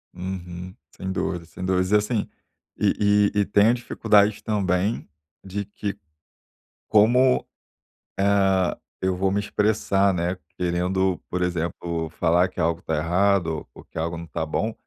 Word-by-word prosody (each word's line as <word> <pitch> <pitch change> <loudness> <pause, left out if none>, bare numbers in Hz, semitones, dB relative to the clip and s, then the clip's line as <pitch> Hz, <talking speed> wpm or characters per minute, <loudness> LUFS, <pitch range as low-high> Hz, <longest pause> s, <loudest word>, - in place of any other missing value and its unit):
Uhum. 90 0 -6 0.2
Sem 95 0 -4
dúvidas, 90 -3 -3
sem 90 - -7
dúvidas. 90 0 +1
E - - +5
assim, 105 +1 +1 0.5
e 105 0 +3
e - - +3
e 100 - +3
tenho 105 +4 +4
dificuldade 105 -4 +2
também, 100 0 0 0.3
de 100 +1 -4
que 100 0 -5 0.9
como, 125 +5 +4 0.7
hã, 95 -2 +3 0.3
eu 95 -1 +1
vou 95 +1 +1
me 100 - +1
expressar, 100 -2 +1
né. 90 +1 -1 0.2
Querendo, 90 +1 0
por 90 - -2
exemplo, 85 -1 -2
falar 85 +2 +2
que 90 - -5
algo 85 +1 0
tá 80 - -2
errado 85 0 +1
ou - - -13
que - - -14
algo 85 +1 -2
não 85 - -7
tá 80 0 -3
bom, 110 +8 -1
95 Hz, 145 wpm, -24 LUFS, 85-100 Hz, 0.9 s, E